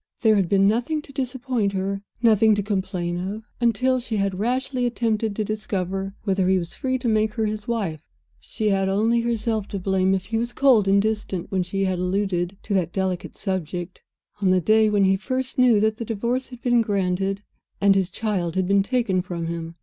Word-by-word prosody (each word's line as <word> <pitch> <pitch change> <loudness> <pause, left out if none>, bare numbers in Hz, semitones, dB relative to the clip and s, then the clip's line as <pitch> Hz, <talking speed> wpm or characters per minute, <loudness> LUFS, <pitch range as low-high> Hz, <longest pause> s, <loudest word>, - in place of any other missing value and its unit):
There 220 -2 +5
had 190 -4 +1
been 195 0 +4
nothing 245 +8 0
to 275 - -12
disappoint 250 -5 -1
her, 195 +1 -2 0.2
nothing 220 -1 +5
to 205 - -1
complain 185 -4 -2
of, 200 +5 -5 0.2
until 255 +3 +2
she 235 -3 -3
had 195 -2 -1
rashly 250 +2 0
attempted 225 -3 -1
to 215 - -1
discover 195 -2 -3
whether 190 -2 +1
he 190 - +4
was 170 -1 -4
free 260 -2 -1
to 245 - -4
make 215 0 +1
her 220 -2 0
his 210 -1 -4
wife. 200 -10 -2 0.4
She 215 -1 -2
had 195 -1 +1
only 225 +4 +2
herself 225 -3 -1
to 200 - -4
blame 190 0 +1
if 190 -1 -3
he 225 +3 -1
was 240 +1 -3
cold 250 -7 +4
and 195 +1 +5
distant 210 -4 -2
when 190 -1 +1
she 195 +2 -1
had 185 -1 -1
alluded 180 0 -1
to - - -3
that 180 -3 +1
delicate 185 -1 -3
subject, 180 -2 -4 0.4
on 190 - +3
the 185 0 +4
day 215 +4 +4
when 205 -1 +2
he 190 0 +3
first 255 +5 -3
knew 245 -4 +5
that 220 0 +1
the 230 - -4
Divorce 235 +4 -2
had 250 -1 -12
been 240 -2 +3
granted 195 -1 -1 0.4
and 200 0 +5
his 190 -2 +1
child 190 -5 -2
had 185 -1 +1
been 200 +1 +4
taken 205 -4 0
from 175 -2 -5
him. 165 0 -5
200 Hz, 205 wpm, -23 LUFS, 190-230 Hz, 0.4 s, There